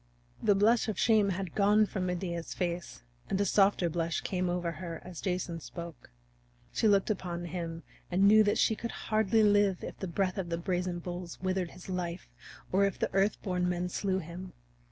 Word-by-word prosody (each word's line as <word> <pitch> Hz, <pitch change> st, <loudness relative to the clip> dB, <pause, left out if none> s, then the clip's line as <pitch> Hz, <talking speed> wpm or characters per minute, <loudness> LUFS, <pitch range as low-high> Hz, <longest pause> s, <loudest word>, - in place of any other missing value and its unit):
The 205 Hz, -, +4 dB
blush 220 Hz, +5 st, +4 dB
of 215 Hz, -4 st, -2 dB
shame 215 Hz, -3 st, +4 dB
had 190 Hz, -2 st, -3 dB
gone 210 Hz, +1 st, +4 dB
from 190 Hz, -3 st, -3 dB
Medea's 175 Hz, -2 st, -3 dB
face 170 Hz, -, -3 dB, 0.3 s
and 190 Hz, -, 0 dB
a 200 Hz, -, +2 dB
softer 195 Hz, -2 st, +3 dB
blush 165 Hz, 0 st, -1 dB
came 180 Hz, -1 st, -1 dB
over 175 Hz, -1 st, -1 dB
her 165 Hz, 0 st, -6 dB
as 180 Hz, -2 st, -8 dB
Jason 180 Hz, -3 st, -2 dB
spoke. 170 Hz, 0 st, -9 dB, 0.6 s
She 220 Hz, -, +2 dB
looked 200 Hz, 0 st, +4 dB
upon 175 Hz, -3 st, -3 dB
him 165 Hz, -1 st, -5 dB, 0.3 s
and 185 Hz, +2 st, +2 dB
she -, -, +7 dB
knew 215 Hz, +2 st, +8 dB
that 205 Hz, -, +2 dB
she 220 Hz, -, +3 dB
could 235 Hz, -, -5 dB, 0.2 s
hardly 220 Hz, +1 st, +4 dB
live 205 Hz, -3 st, +3 dB
if -, -, -7 dB
the 190 Hz, -, -3 dB
breath 185 Hz, +2 st, -1 dB
of 175 Hz, -3 st, -3 dB
the 170 Hz, -, -1 dB
brazen 180 Hz, 0 st, -1 dB
bulls 175 Hz, 0 st, -6 dB
withered 185 Hz, -1 st, -1 dB
his 180 Hz, -, -13 dB
life 180 Hz, -, -4 dB, 0.4 s
or 195 Hz, +2 st, +3 dB
if 200 Hz, -2 st, +1 dB
the -, -, -2 dB
Earth 195 Hz, +2 st, +2 dB
born 180 Hz, -2 st, 0 dB
Men 180 Hz, 0 st, -1 dB
slew 190 Hz, +1 st, -1 dB
him. 180 Hz, +1 st, -7 dB
185 Hz, 195 wpm, -31 LUFS, 175-200 Hz, 0.6 s, knew